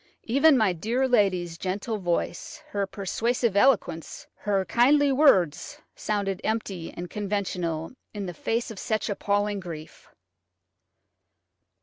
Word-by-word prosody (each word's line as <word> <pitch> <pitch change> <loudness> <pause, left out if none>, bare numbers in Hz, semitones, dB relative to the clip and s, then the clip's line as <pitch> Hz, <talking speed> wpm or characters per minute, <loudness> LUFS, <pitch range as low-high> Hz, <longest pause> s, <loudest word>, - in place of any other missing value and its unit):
Even 280 +4 +4
my 215 -6 +3
dear 235 +10 0
lady's 185 -8 +1
gentle 205 +4 -3
voice, 175 -1 -3
her 200 -1 -1
persuasive 225 +3 -1
eloquence, 200 -7 +1
her 195 -2 0
kindly 280 +6 +4
words, 225 - +3 0.2
sounded 200 -3 -2
empty 195 -6 -3
and 175 +1 -5
conventional 180 -5 -3 0.2
in 205 -2 -5
the 175 - -5
face 230 +8 -2
of 205 - -8
such 215 -1 -1
appalling 205 0 0
grief. 165 -4 -9
200 Hz, 115 wpm, -26 LUFS, 180-230 Hz, 0.2 s, Even